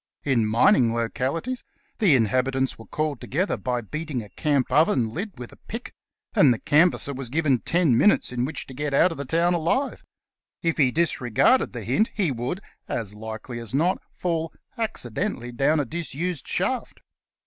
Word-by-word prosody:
In 120 -6 +2
mining 115 - +4
localities 135 - -2 0.4
the 190 - +5
inhabitants 130 +3 +1
were 115 - -13
called 155 -4 -2
to - - -8
gether 185 +9 0
by 125 -1 -2
beating 150 +1 -4
a 105 - -13
camp 145 -1 0
oven 130 -7 +3
lid 200 - -5
with 120 -1 -8
a - - -16
pick, - - -6 0.4
and 140 - +6
the 120 - +1
can 155 +9 +5
vasser 140 - -2
v/as 130 -2 -6
given 145 -3 +2
ten 165 -1 +2
minutes 205 - +4
in 125 -1 -1
which 145 +5 -3
to 130 - -11
get 145 +1 -2
out 180 +5 +5
of 165 - -7
the 140 - -3
town 170 +5 +2
alive. 175 - 0 0.6
If 165 -1 0
he 135 -4 +5
disregarded 160 - +2
the - - -6
hint 215 +2 +2
he 190 -8 +1
would, 130 - -3 0.3
as 105 -4 -3
likely 110 +3 -7
as 115 +2 -5
not, 170 +6 +2
fall 165 -2 -2 0.2
accidentally 180 - -3
down 140 +6 +2
a 145 - 0
disused 170 +2 -4
shaft. - - -2
140 Hz, 180 wpm, -25 LUFS, 120-170 Hz, 0.6 s, and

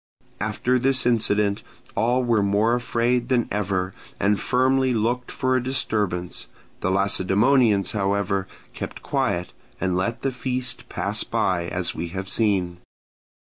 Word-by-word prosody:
After 125 +1 0
this 130 0 +2
incident 105 -4 +2 0.3
all 120 +4 +2
were 115 -3 +2
more 100 +3 +2
afraid 120 0 0
than 125 -3 +2
ever, 95 -2 -1 0.3
and 100 +1 +2
firmly 130 0 +2
looked 120 +3 0
for 130 -1 0
a 130 - +2
disturbance: 105 -8 -1 0.3
the - - -1
Lacedaemonians, 100 +3 +3
however, 100 -1 0 0.3
kept - - -7
quiet, 90 +1 -1 0.3
and 95 -2 0
let 115 +6 -1
the 135 - +1
feast 125 0 -3
pass - - -2
by, 85 -2 0
as 90 0 -2
we 85 - -4
have 95 +3 -5
seen. 95 -6 +1
105 Hz, 135 wpm, -24 LUFS, 95-125 Hz, 0.3 s, Lacedaemonians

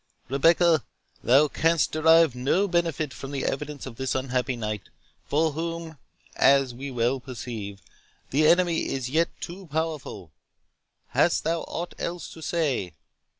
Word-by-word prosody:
"Rebecca, 165 +3 +4 0.4
thou 135 +6 +5
canst 165 +2 +1
derive 160 -1 +5
no 135 +11 +1
benefit 165 -5 0
from 135 - -8
the 140 -1 -3
evidence 145 +1 -3
of 125 -4 -9
this 130 0 -2
unhappy 130 0 -1
knight, 105 -4 -4 0.4
for 155 +2 +2
whom, 165 0 -5 0.4
as 135 -2 +4
we 135 +4 -6
well 125 +1 0
perceive, 115 -6 -7 0.5
the 150 +3 +4
Enemy 170 0 +3
is 130 -2 -3
yet 165 +3 +2
too 185 +2 -8
powerful. 150 - -4 0.8
Hast 170 - +2
thou 165 0 0
aught 175 +1 -5
else 175 0 -5
to 160 - -12
say?" 140 - -1
145 Hz, 140 wpm, -26 LUFS, 130-165 Hz, 0.8 s, thou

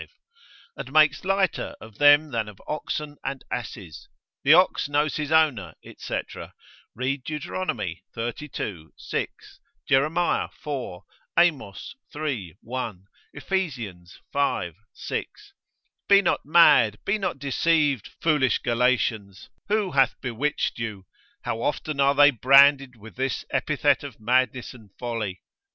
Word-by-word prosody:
And 130 - -8
makes 155 -2 +4
lighter 190 -2 0
of 110 -1 -14
them 145 +1 +6
than 115 -3 -2
of 100 - -14
oxen 150 -1 -4
and 135 0 -5
asses, 100 -9 -7 0.3
the 140 - +4
ox 180 -4 +3
knows 145 +1 +1
his 150 -1 -3
owner, 140 - +2 0.2
&c.: - - -3 0.8
read 130 +2 -2
Deut. 150 0 -5 0.7
xxxii. 115 - -5
6; - - -6 0.3
Jer. 135 +1 +4
iv.; 150 - -3 0.4
Amos, 155 - +1 0.2
iii. 125 - -4
1; 115 -6 -5 0.3
Ephes. 115 - -4 0.2
v. 140 -11 0 0.2
6. 415 -1 -6 0.6
Be 200 0 +7
not - - 0
mad, 130 -9 +5
be 205 +2 0
not 195 - -2
deceived, 145 -2 +1
foolish 150 -6 +2
Galatians, 115 -5 -1 0.2
who 210 -3 0
hath 135 -2 +2
bewitched 125 +2 -2
you? 105 -4 -5 0.4
How 115 - -3
often 150 +2 -2
are 140 0 +4
they 145 0 +7
branded 135 +1 +5
with 110 +1 -14
this 135 0 -2
epithet - - +1
of - - -9
madness 125 +2 0
and 110 -5 -16
folly? 115 -6 -4
135 Hz, 120 wpm, -25 LUFS, 115-150 Hz, 0.8 s, Be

